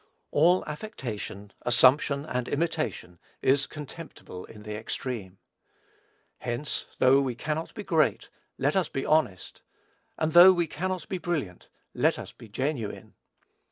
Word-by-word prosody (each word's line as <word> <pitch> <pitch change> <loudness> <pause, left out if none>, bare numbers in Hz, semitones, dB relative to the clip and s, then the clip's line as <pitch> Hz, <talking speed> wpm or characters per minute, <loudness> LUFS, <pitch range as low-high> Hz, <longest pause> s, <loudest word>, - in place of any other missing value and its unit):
All 175 +5 +4
affectation, 120 - -6
assumption, 140 +4 +4
and 125 -4 -2
imitation, 155 - -2 0.2
is 135 +1 +3
contemptible 150 - -9
in 105 -1 -13
the 105 0 -5
extreme. 110 -3 -5 1.0
Hence, 120 +5 -3
though 135 +2 +5
we 130 -3 -2
cannot 155 +5 -3
be 210 - -5
great, 160 -6 +1 0.3
let 145 +3 +1
us 190 -2 +1
be 135 - -3
honest; 150 -13 0 0.6
and 155 0 0
though 175 +2 +10
we 175 -2 +1
cannot 180 +2 -3
be 185 - -3
brilliant, 145 - -3 0.3
let - - +2
us - - -7
be 115 - -14
genuine. 130 -1 -3
140 Hz, 130 wpm, -27 LUFS, 120-160 Hz, 1.0 s, though